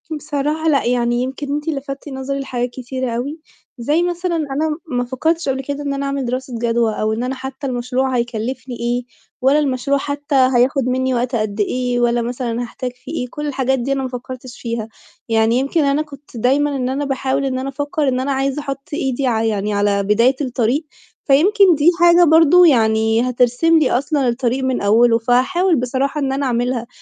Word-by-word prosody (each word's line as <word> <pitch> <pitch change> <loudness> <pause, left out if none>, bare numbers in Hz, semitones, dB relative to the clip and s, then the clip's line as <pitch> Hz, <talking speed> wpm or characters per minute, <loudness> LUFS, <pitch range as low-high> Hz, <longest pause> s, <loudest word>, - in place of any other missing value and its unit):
بصراحة 300 +1 -1
لأ، 280 -3 +2
يعني 240 0 +1
يمكن 270 +2 -4
أنتِ 295 +2 -3
لفتِّ 275 -1 -5
نظري 270 +1 -4
لحاجات 250 -2 -3
كتيرة 255 0 -4
أوي، 270 +7 -4 0.4
زي 295 +8 +1
مثلًا 350 0 -1
أنا 300 0 -1
ما 245 -4 -1
فكّرتش 315 +5 -1
قبل 265 0 -1
كده 285 +2 -4
إن 280 -1 -2
أنا 275 0 -3
أعمل 275 -1 -2
دراسة 255 +1 -4
جدوى 230 -1 +1
أو 215 +1 -1
إن 225 +2 -2
أنا 255 +1 -2
حتى 265 +1 -6
المشروع 255 +1 -1
هيكلّفني 240 +2 -3
إيه، 240 +1 -1 0.4
ولا 270 +4 +4
المشروع 280 -1 0
حتى 285 +1 -3
هياخُد 260 +1 +3
منّي 260 +1 0
وقتها 245 -1 0
قد 215 0 -4
إيه، 245 +3 0
ولا 240 0 +2
مثلًا 240 0 -3
هاحتاج 245 +1 -5
فيه - - -11
إيه، 250 - -3
كل 295 +3 -5
الحاجات 265 -2 0
دي 250 +3 -2
أنا 270 -1 0
ما 260 - -3
فكّرتش 250 0 -8
فيها، 230 -2 -3 0.4
يعني 225 0 +3
يمكن 280 +4 +1
أنا 280 +1 +2
كنت 285 -4 -11
دايمًا 280 +5 +1
إن 255 -2 -1
أنا 280 +2 -2
باحاول 270 0 -1
إن 260 -1 -1
أنا 265 +1 -3
أفكّر 290 +2 -2
إن 255 -1 +1
أنا 270 +2 -1
عايزة 270 +1 -1
أحُط 275 -1 -6
إيدي 270 -3 -1
ع 225 -2 +1
يعني 210 -2 -1
على 200 0 +1
بداية 230 +6 +3
الطريق، 255 +2 0 0.4
فيمكن 365 +6 +5
دي 300 +3 +4
حاجة 345 0 +6
برضه 330 +2 +6
يعني 220 -2 +3
هترسم 250 +7 +3
لي 295 - +2
أصلًا 275 +1 +1
الطريق 245 +2 0
من 260 -1 0
أوّله؛ 230 +3 +4
فهاحاول 345 +9 +3
بصراحة 265 +4 -1
إن 270 -1 0
أنا 275 +1 -1
أعملها، 245 -1 -1
260 Hz, 190 wpm, -19 LUFS, 245-285 Hz, 0.4 s, حاجة